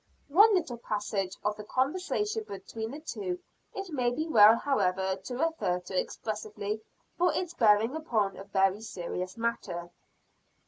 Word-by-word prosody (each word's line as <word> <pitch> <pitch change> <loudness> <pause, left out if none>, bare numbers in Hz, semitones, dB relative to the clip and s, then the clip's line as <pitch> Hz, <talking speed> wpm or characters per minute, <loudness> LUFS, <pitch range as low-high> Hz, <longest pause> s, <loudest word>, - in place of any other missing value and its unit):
One 410 +8 +7
little 265 -10 -1
passage 205 -4 -2
of 210 0 0
the 210 - -7
conversation 370 - -1
between 220 +3 -6
the 290 +5 -7
two 360 +3 -4 0.4
it 390 -3 -5
may 250 -5 +1
be 310 +7 -2
well 220 -6 +8
however 190 -8 +1
to 200 +6 -7
refer 320 - 0
to 180 +1 -8
expressly 215 -1 -4 0.4
for 355 0 +4
its 350 -1 -2
bearing 225 0 +4
upon 220 - 0
a 195 - -9
very 195 0 +2
serious 185 -1 -5
matter. 175 -7 -3
225 Hz, 145 wpm, -30 LUFS, 195-315 Hz, 0.4 s, well